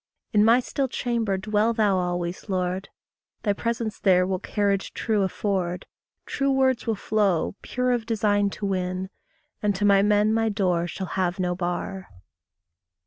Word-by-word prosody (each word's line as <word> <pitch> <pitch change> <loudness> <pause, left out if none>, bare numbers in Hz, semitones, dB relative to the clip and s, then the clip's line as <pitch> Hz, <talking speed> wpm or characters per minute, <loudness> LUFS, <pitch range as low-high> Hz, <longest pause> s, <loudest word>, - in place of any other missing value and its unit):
In 210 -1 +5
my 230 +3 +6
still 270 +2 -2
chamber 235 -5 -1
dwell 210 +3 +1
thou 210 -4 +2
always, 175 +2 -3
Lord; 185 0 -2 0.5
Thy 205 - +2
presence 230 +1 -3
there 180 -2 +4
will 185 0 -1
carriage 200 -1 -1
true 215 -3 0
afford; 190 -2 -1 0.4
True 275 0 -1
words 260 -3 +2
will 225 - +1
flow, 200 -5 +1
pure 250 0 -1
of 235 -2 -1
design 205 -2 +2
to 205 - -4
win; 185 0 -2 0.5
And 205 -1 +1
to 205 +2 0
my 200 -1 +5
men 210 +1 +3
my 225 0 +2
door 180 -5 0
shall 190 +2 -5
have 180 0 -1
no 180 -1 0
bar. 180 +1 -4
200 Hz, 155 wpm, -25 LUFS, 185-220 Hz, 0.5 s, my